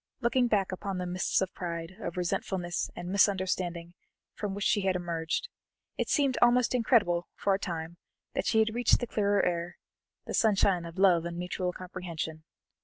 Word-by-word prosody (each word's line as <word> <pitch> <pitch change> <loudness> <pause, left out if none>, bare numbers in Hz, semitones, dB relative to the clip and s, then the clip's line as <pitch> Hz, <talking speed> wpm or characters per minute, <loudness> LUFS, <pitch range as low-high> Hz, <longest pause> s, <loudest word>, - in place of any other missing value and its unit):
Looking 245 +1 +2
back 200 -5 +1
upon 190 +1 -4
the 180 - -2
mists 180 +1 0
of 190 - -2
pride, 170 +1 -5
of 175 -4 -5
resentfulness, 175 0 -1
and 175 0 -6
misunderstanding, 185 -3 +1 0.4
from 200 -2 -4
which 200 -1 -3
she 205 - +3
had 190 -1 +1
emerged, 170 - -2 0.5
it - - -2
seemed 275 -3 +2
almost 245 0 +4
incredible 215 -8 +2
for 200 - +1
a 190 - 0
time 170 -3 -5 0.4
that - - -1
she 220 - +2
had 220 0 +3
reached 240 +1 +4
the 245 - -2
clearer 205 -3 +1
air, 175 0 -2 0.5
the - - -5
sunshine 195 -5 +3
of 170 +1 -9
love 185 -4 +5
and 170 0 -5
mutual 180 +1 -2
comprehension. 175 -4 -6
185 Hz, 175 wpm, -29 LUFS, 175-205 Hz, 0.5 s, love